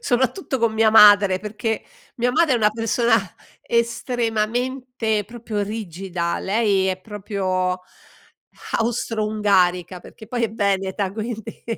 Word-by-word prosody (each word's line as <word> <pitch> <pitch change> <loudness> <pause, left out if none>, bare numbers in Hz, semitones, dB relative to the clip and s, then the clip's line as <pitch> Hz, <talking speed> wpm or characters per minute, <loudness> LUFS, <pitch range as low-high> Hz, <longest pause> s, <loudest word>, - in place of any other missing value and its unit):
soprattutto 260 - 0
con 230 -1 +1
mia 220 0 +3
madre 205 -3 +7
perché, 215 +2 -3 0.3
mia 245 +1 +1
madre 315 -4 +3
è - - +3
una 210 -2 +3
persona 225 +1 +2 0.5
estremamente 235 0 -1
proprio 225 -2 -4
rigida, 185 -4 -4
lei 200 -2 +1
è 185 0 -2
proprio 185 -3 -2 1.0
austro-ungarica 210 -6 0
perché 220 +4 -14
poi 240 -1 -1
è 220 - -3
veneta 195 -2 -1
quindi, 220 0 -6
215 Hz, 110 wpm, -22 LUFS, 195-235 Hz, 1.0 s, madre